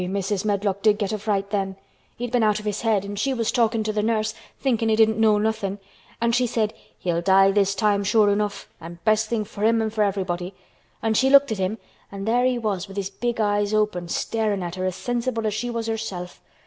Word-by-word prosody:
Eh! -, -, -2 dB
Mrs. 195 Hz, +1 st, -2 dB
Medlock 200 Hz, -1 st, 0 dB
did 210 Hz, -1 st, +4 dB
get 205 Hz, -1 st, -2 dB
a 215 Hz, -, -2 dB
fright 200 Hz, -1 st, -1 dB
then. 195 Hz, -2 st, -1 dB, 0.4 s
He'd 245 Hz, 0 st, -4 dB
been 245 Hz, -1 st, +2 dB
out 210 Hz, -1 st, +3 dB
of 210 Hz, -, -10 dB
his 210 Hz, -1 st, -2 dB
head 215 Hz, -4 st, +1 dB
an' 200 Hz, 0 st, -6 dB
she 265 Hz, +6 st, 0 dB
was 230 Hz, -2 st, 0 dB
talkin' 230 Hz, -2 st, +1 dB
to 215 Hz, 0 st, -2 dB
th' 210 Hz, 0 st, 0 dB
nurse, 215 Hz, -1 st, 0 dB, 0.3 s
thinkin' 230 Hz, -4 st, +1 dB
he 220 Hz, -, +4 dB
didn't 220 Hz, 0 st, +3 dB
know 215 Hz, -1 st, +4 dB
nothin', 210 Hz, -2 st, -1 dB, 0.4 s
an' 235 Hz, 0 st, +2 dB
she 245 Hz, +1 st, +2 dB
said, 225 Hz, -3 st, 0 dB, 0.2 s
'He'll 170 Hz, +3 st, -1 dB
die 195 Hz, +2 st, +5 dB
this 200 Hz, -1 st, +2 dB
time 205 Hz, 0 st, +2 dB
sure 205 Hz, +1 st, +4 dB
enough, 205 Hz, 0 st, -2 dB
an' 170 Hz, +1 st, -9 dB
best 215 Hz, 0 st, +2 dB
thing 230 Hz, -2 st, 0 dB
for 205 Hz, 0 st, -7 dB
him 225 Hz, +1 st, +4 dB
an' 220 Hz, -1 st, -1 dB
for 215 Hz, -1 st, +1 dB
everybody.' 185 Hz, -2 st, -2 dB, 0.5 s
An' 225 Hz, -1 st, +2 dB
she 265 Hz, +5 st, +3 dB
looked 280 Hz, -2 st, +6 dB
at 215 Hz, -, -2 dB
him 190 Hz, +4 st, -1 dB, 0.3 s
an' 195 Hz, 0 st, -6 dB
there 240 Hz, +3 st, +2 dB
he 255 Hz, -1 st, +2 dB
was 205 Hz, -5 st, -2 dB
with 195 Hz, +1 st, -11 dB
his 195 Hz, -1 st, -3 dB
big 240 Hz, +3 st, -3 dB
eyes 205 Hz, 0 st, +1 dB
open, 210 Hz, -5 st, 0 dB
starin' 210 Hz, +2 st, -1 dB
at 170 Hz, -1 st, -5 dB
her 185 Hz, 0 st, -3 dB
as 185 Hz, -1 st, -1 dB
sensible 240 Hz, -1 st, -2 dB
as 215 Hz, -, 0 dB
she 240 Hz, +3 st, -3 dB
was 230 Hz, -1 st, -3 dB
herself. 215 Hz, -6 st, -5 dB
210 Hz, 240 wpm, -23 LUFS, 195-225 Hz, 0.5 s, looked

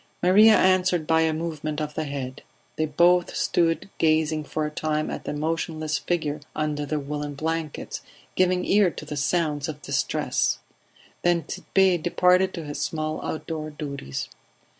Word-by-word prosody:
Maria 210 Hz, +5 st, +7 dB
answered 185 Hz, -3 st, +3 dB
by 160 Hz, +1 st, +3 dB
a 160 Hz, 0 st, +3 dB
movement 155 Hz, -1 st, -3 dB
of 150 Hz, -1 st, -3 dB
the 155 Hz, -, -2 dB
head. 135 Hz, -3 st, -5 dB, 0.3 s
They 155 Hz, -, 0 dB
both 175 Hz, +4 st, +3 dB
stood 165 Hz, +1 st, +1 dB
gazing 155 Hz, -1 st, +2 dB
for 155 Hz, +1 st, -2 dB
a 150 Hz, -, -3 dB
time 155 Hz, 0 st, -1 dB
at -, -, -6 dB
the -, -, -3 dB
motionless 155 Hz, 0 st, -2 dB
figure 155 Hz, -4 st, -1 dB, 0.2 s
under 150 Hz, -1 st, -1 dB
the 155 Hz, +1 st, -1 dB
woollen 145 Hz, 0 st, -4 dB
blankets, 160 Hz, 0 st, -3 dB, 0.3 s
giving 185 Hz, 0 st, +2 dB
ear 200 Hz, -2 st, +4 dB
to -, -, -9 dB
the 150 Hz, -, -5 dB
sounds 150 Hz, 0 st, 0 dB
of 150 Hz, -2 st, -7 dB
distress; -, -, 0 dB, 0.6 s
then 175 Hz, -1 st, +2 dB
Tit'Bé 190 Hz, -3 st, +1 dB
departed 180 Hz, +2 st, +3 dB
to 165 Hz, -, -5 dB
his 145 Hz, -1 st, -5 dB
small 155 Hz, +1 st, -2 dB
outdoor 155 Hz, -1 st, -4 dB
duties. 140 Hz, -, -5 dB
155 Hz, 155 wpm, -25 LUFS, 150-175 Hz, 0.6 s, Maria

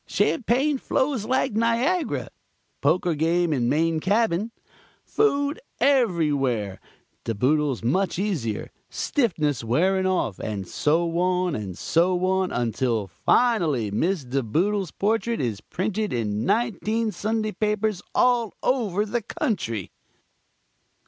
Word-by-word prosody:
Champagne 265 Hz, +4 st, +1 dB
flows 260 Hz, -5 st, 0 dB
like 260 Hz, 0 st, +1 dB
Niagara. 235 Hz, -, 0 dB, 0.5 s
Poker 180 Hz, -1 st, +2 dB
game 165 Hz, +2 st, +1 dB
in 120 Hz, -4 st, +1 dB
main 160 Hz, +1 st, +1 dB
cabin. 205 Hz, +2 st, +1 dB, 0.5 s
Food 290 Hz, -7 st, +1 dB, 0.2 s
everywhere. 150 Hz, -, +1 dB, 0.4 s
De 115 Hz, -, -2 dB
Boodles 140 Hz, +2 st, +1 dB
much 180 Hz, +10 st, +1 dB
easier. 165 Hz, -, -2 dB, 0.2 s
Stiffness 155 Hz, -, 0 dB
wearing 185 Hz, +11 st, +2 dB
off, 175 Hz, -, -1 dB
and 100 Hz, -4 st, -4 dB
so 165 Hz, +2 st, +1 dB
on 180 Hz, -1 st, +1 dB
and 100 Hz, -4 st, -5 dB
so 180 Hz, +2 st, +1 dB
on 190 Hz, 0 st, +1 dB
until 115 Hz, -2 st, 0 dB
finally 145 Hz, -, +1 dB
Miss 170 Hz, -, 0 dB
De 135 Hz, +2 st, -1 dB
Boodle's 185 Hz, -, 0 dB
portrait 225 Hz, +6 st, 0 dB
is 115 Hz, -6 st, -2 dB
printed 210 Hz, +3 st, -2 dB
in 110 Hz, -2 st, -1 dB
nineteen 225 Hz, 0 st, 0 dB
Sunday 215 Hz, +1 st, -1 dB
newspapers 210 Hz, -1 st, -1 dB
all 240 Hz, -3 st, +2 dB
over 215 Hz, -6 st, +1 dB
the 235 Hz, +3 st, -2 dB
country. 205 Hz, -, -3 dB
185 Hz, 115 wpm, -24 LUFS, 135-225 Hz, 0.5 s, Poker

